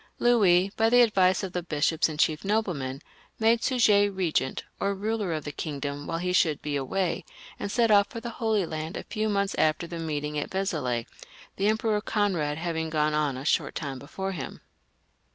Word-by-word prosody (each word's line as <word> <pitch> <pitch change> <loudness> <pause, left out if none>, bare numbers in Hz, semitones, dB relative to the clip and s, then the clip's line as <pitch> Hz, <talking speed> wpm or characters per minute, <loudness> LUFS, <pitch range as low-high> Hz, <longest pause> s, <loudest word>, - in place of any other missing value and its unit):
Louis, 200 -6 +4
by 225 0 +3
the 245 +1 +7
advice 190 -4 +3
of 190 -1 -4
the 180 - -1
bishops 160 -1 +1
and 155 - -6
chief 155 0 +1
noblemen, 175 -10 -1 0.3
made 225 +1 +3
Suger 210 -6 +4
regent, 170 -8 -1 0.2
or 200 0 0
ruler 210 -1 -2
of 155 -2 -2
the 145 - -5
kingdom 145 -1 -5
while 165 - -2
he 180 +1 -1
should 160 -5 +3
be 150 -1 -2
away, 170 +7 -1 0.4
and 200 - -3
set 230 0 +3
off 200 -1 +6
for 230 - -7
the 235 +1 -6
Holy 220 -4 +2
Land 160 +1 -5
a - - -5
few 215 0 -2
months 200 -1 0
after 155 +2 +2
the 170 0 -6
meeting 150 -2 -2
of - - -4
Vezelay; 150 -12 -1 0.5
the 195 - +1
Emperor 215 -1 +1
Conrad 180 -9 0
having 160 -1 -2
gone 155 -1 +1
on 150 -3 0
a 135 - -7
short - - +1
time 140 -4 -4
before 190 +8 -5
him. 160 -8 -6
175 Hz, 190 wpm, -27 LUFS, 150-205 Hz, 0.5 s, the